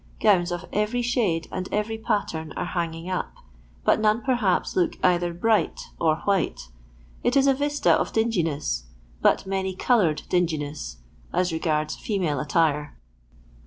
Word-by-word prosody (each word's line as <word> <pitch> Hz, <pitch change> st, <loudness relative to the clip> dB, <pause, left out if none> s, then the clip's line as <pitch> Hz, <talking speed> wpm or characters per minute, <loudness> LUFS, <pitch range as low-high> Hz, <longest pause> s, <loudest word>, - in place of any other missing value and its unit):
Gowns 180 Hz, -5 st, +3 dB
of 175 Hz, -1 st, -4 dB
every 215 Hz, +4 st, 0 dB
shade 215 Hz, -9 st, 0 dB
and 185 Hz, 0 st, -4 dB
every 220 Hz, +2 st, -1 dB
pattern 165 Hz, -7 st, -2 dB
are -, -, -3 dB
hanging 165 Hz, -1 st, -3 dB
up, 185 Hz, -1 st, -3 dB, 0.5 s
but -, -, +4 dB
none, 215 Hz, +2 st, +2 dB
perhaps, 240 Hz, -8 st, +1 dB
look 180 Hz, -2 st, +1 dB
either 175 Hz, -1 st, +3 dB
bright 215 Hz, +6 st, +1 dB, 0.2 s
or 160 Hz, -2 st, +3 dB
white; 195 Hz, -, 0 dB, 0.5 s
it 245 Hz, +3 st, +2 dB
is 275 Hz, -, +5 dB
a 275 Hz, -, +5 dB
vista 290 Hz, +2 st, +1 dB
of -, -, +1 dB
dinginess, 165 Hz, -, 0 dB, 0.4 s
but -, -, +3 dB
many 190 Hz, -1 st, -2 dB
coloured 185 Hz, -8 st, +2 dB
dingi 175 Hz, -3 st, +1 dB
ness, 145 Hz, -, -6 dB, 0.3 s
as 180 Hz, -1 st, +1 dB
regards 155 Hz, -2 st, 0 dB
female 180 Hz, -9 st, -1 dB
attire. 150 Hz, -1 st, 0 dB
180 Hz, 145 wpm, -25 LUFS, 160-215 Hz, 0.5 s, is